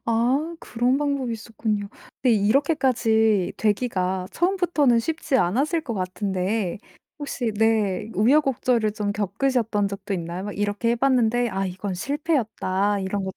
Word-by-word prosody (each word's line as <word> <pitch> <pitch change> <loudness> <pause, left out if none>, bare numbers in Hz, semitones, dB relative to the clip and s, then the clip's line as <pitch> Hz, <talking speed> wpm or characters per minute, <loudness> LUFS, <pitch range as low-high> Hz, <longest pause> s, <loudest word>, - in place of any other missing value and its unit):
아. 235 +3 +2 0.3
그런 245 +3 0
방법이 280 -4 -1
있었군요. 215 -2 -3 0.3
근데 245 -4 +4
이렇게까지 225 - +2
되기가 190 -4 0
처음부터는 345 -9 +2
쉽지 315 +1 -1
않았을 275 - +1
것 235 -7 -4
같은데 190 +1 -2 0.4
혹시 245 -5 -2
네 215 -2 +1
우여곡절을 245 -2 +2
좀 205 -1 -2
겪으셨던 215 0 0
적도 195 0 -4
있나요? 175 +2 -4
막 205 -1 -6
'이렇게 205 +3 0
해 235 - +3
봤는데 245 -2 +2
아 195 +1 -2
이건 185 +1 -4
실패였다.' 215 - -1
이런 195 +1 -2
것도 190 - -6
220 Hz, 320 characters per minute, -24 LUFS, 200-255 Hz, 0.4 s, 근데